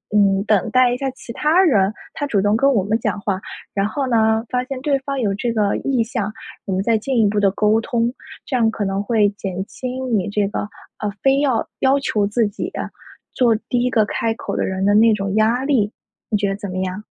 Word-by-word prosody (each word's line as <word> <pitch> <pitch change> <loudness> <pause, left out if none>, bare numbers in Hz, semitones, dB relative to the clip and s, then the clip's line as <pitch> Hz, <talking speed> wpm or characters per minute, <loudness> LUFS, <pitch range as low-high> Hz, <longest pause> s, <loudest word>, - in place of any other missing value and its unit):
嗯， 195 -1 +3
等 205 -4 +1
待 255 -1 +4
一 - - -2
下 270 -1 -2
其 245 -2 -10
他 315 +8 +3
人， 210 - +3 0.2
他 290 - -3
主 210 -9 +1
动 205 +1 +2
跟 275 +4 +3
我 200 - +2
们 220 +2 +1
讲 205 - -2
话。 200 -1 -2 0.3
然 195 0 +1
后 270 +4 -2
呢， 220 -1 +2
发 250 -1 0
现 260 0 -5
对 280 -1 +1
方 275 0 -4
有 210 -5 0
这 235 +3 -1
个 210 -3 +1
意 260 -4 0
向， 215 -3 -3 0.3
我 195 - -4
们 190 - 0
再 225 +1 +2
进 250 +3 -1
一 215 - +4
步 205 +1 0
地 195 - +4
沟 215 +3 +2
通， 235 -1 -1 0.3
这 265 - -3
样 225 -2 +3
可 210 -2 -3
能 195 +1 -1
会 215 -1 +3
减 190 -2 -5
轻 255 -2 -3
你 190 - -2
这 205 -1 0
个， - - -3 0.4
呃， 210 -1 -2
非 270 0 +3
要 260 -6 +1
要 270 +1 +3
求 210 -6 0
自 220 +1 +1
己， 205 - -5 0.6
做 235 -3 +3
第 245 -1 +1
1 250 - +1
个 220 -4 +3
开 225 +2 -1
口 225 - -5
的 - - 0
人 190 +1 -2
的 205 - +4
那 225 +1 +6
种 200 -1 -2
压 230 +4 +2
力。 230 -7 +2 0.4
你 210 - +2
觉 200 0 0
得 195 - -1
怎 205 -1 -6
么 185 - -4
样？ 185 +2 -3
220 Hz, 250 characters per minute, -20 LUFS, 205-250 Hz, 0.6 s, 那